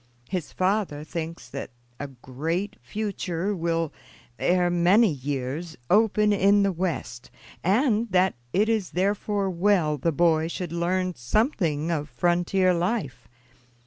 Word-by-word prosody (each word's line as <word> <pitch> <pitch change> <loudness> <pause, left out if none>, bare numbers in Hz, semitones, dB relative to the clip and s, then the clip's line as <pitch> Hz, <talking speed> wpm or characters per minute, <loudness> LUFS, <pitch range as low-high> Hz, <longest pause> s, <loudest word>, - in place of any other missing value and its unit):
His 180 -5 -3
father 185 -6 0
thinks 165 +1 -6
that 140 - -6 0.3
a 145 - -4
great 145 - -4
future 200 -2 -3
will, 165 -2 -1 0.5
ere 180 0 +2
many 180 +5 +4
years, 145 +4 -4
open 210 0 +4
in 200 +1 +4
the 200 - +2
West, 170 -9 -4 0.3
and 225 - +2
that 185 +1 +3 0.2
it 205 - +2
is 220 -5 0
therefore 200 +1 0
well 170 -5 +2
the 165 +6 +1
boy 160 0 +2
should 170 0 -5
learn 180 +2 0
something 165 - 0
of 150 -2 -2
frontier 175 +7 +2
life. 170 - -2
175 Hz, 125 wpm, -25 LUFS, 160-200 Hz, 0.5 s, many